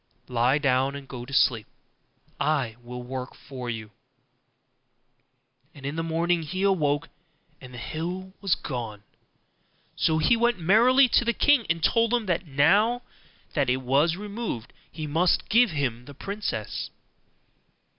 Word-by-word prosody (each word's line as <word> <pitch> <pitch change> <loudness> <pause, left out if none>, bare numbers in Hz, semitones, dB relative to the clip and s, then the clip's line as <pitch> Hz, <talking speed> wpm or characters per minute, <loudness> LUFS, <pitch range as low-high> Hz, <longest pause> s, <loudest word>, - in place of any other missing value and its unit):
'Lie 125 +2 +2
down 135 -1 +1
and 140 -1 -8
go 120 -2 -7
to 130 - -12
sleep; 115 -5 +2 0.7
I 140 -7 0
will 125 +1 -8
work 130 +1 -6
for 130 -3 -8
you.' 110 -2 -5 1.8
And 140 -2 -11
in 140 +2 -3
the 165 - -1
morning 165 +1 0
he 185 +5 -4
awoke 155 -6 +1 0.5
and 130 -1 -11
the 125 - -10
hill 180 +8 -5
was 195 -4 +2
gone; 115 -6 -6 0.9
so 160 - +2
he 160 +10 +4
went 235 -1 +2
merrily 235 +10 +5
to 240 - +4
the 235 0 +1
king, 285 -4 +3
and 165 -1 0
told 230 0 +3
him 235 -3 -1
that 180 -1 -1
now 200 - +3 0.5
that 140 -5 +1
it 130 +1 0
was 145 +6 +3
removed 205 - -5 0.2
he 155 -1 -6
must 165 +5 +1
give 240 +1 +5
him 130 -7 -2
the 145 - -12
princess. 200 - -4
155 Hz, 145 wpm, -26 LUFS, 130-195 Hz, 1.8 s, merrily